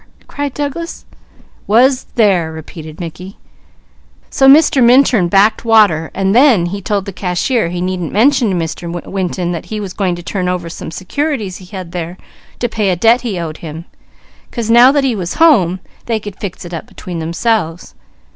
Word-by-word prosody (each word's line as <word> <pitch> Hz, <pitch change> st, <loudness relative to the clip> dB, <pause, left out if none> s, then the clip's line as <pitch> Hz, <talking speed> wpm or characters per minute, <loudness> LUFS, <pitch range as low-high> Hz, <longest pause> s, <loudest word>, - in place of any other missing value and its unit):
'" -, -, -29 dB
cried 285 Hz, -1 st, -4 dB
Douglas. 295 Hz, +4 st, -5 dB, 0.6 s
"'Was 255 Hz, +5 st, +3 dB
there,'" 190 Hz, -8 st, +2 dB
repeated 160 Hz, 0 st, -10 dB
Mickey; 180 Hz, +3 st, -8 dB, 0.9 s
"so 270 Hz, -, +3 dB
Mr. 280 Hz, -2 st, +6 dB
Minturn 240 Hz, -6 st, +4 dB
backed 205 Hz, +5 st, +3 dB
water, 210 Hz, -9 st, +3 dB
and 195 Hz, 0 st, +1 dB
then 245 Hz, -9 st, +5 dB
he 200 Hz, +3 st, -4 dB
told 200 Hz, 0 st, -2 dB
the 200 Hz, -, -7 dB
cashier 180 Hz, +3 st, -1 dB
he 175 Hz, 0 st, -4 dB
needn't 180 Hz, -3 st, -3 dB
mention 245 Hz, +1 st, +3 dB
to 190 Hz, -, 0 dB
Mr. 170 Hz, 0 st, -4 dB, 0.2 s
Winton 180 Hz, -2 st, -3 dB
that 170 Hz, -2 st, -5 dB
he 215 Hz, -, -4 dB
was 195 Hz, -3 st, -6 dB
going 185 Hz, -3 st, -1 dB
to 175 Hz, -, -9 dB
turn 180 Hz, 0 st, -2 dB
over 180 Hz, -2 st, -3 dB
some -, -, -7 dB
securities 210 Hz, -, -3 dB
he 185 Hz, -, -13 dB
had 185 Hz, -2 st, -8 dB
there 175 Hz, 0 st, -5 dB, 0.4 s
to 240 Hz, -, -1 dB
pay 215 Hz, -3 st, -1 dB
a 180 Hz, -, +1 dB
debt 230 Hz, +7 st, +3 dB
he 225 Hz, -7 st, -3 dB
owed 160 Hz, -2 st, -5 dB
him, 160 Hz, +1 st, -8 dB, 0.6 s
'cause 230 Hz, -2 st, -3 dB
now 240 Hz, +3 st, +7 dB
that 285 Hz, -1 st, +1 dB
he 265 Hz, -3 st, +1 dB
was 180 Hz, -4 st, -4 dB
home, 200 Hz, -, +4 dB, 0.3 s
they 225 Hz, -2 st, 0 dB
could 205 Hz, -2 st, -8 dB
fix 185 Hz, -3 st, -6 dB
it 175 Hz, -, -9 dB
up 165 Hz, -, -6 dB
between 175 Hz, -2 st, -7 dB
themselves. 170 Hz, +1 st, -2 dB
195 Hz, 185 wpm, -15 LUFS, 175-235 Hz, 0.9 s, now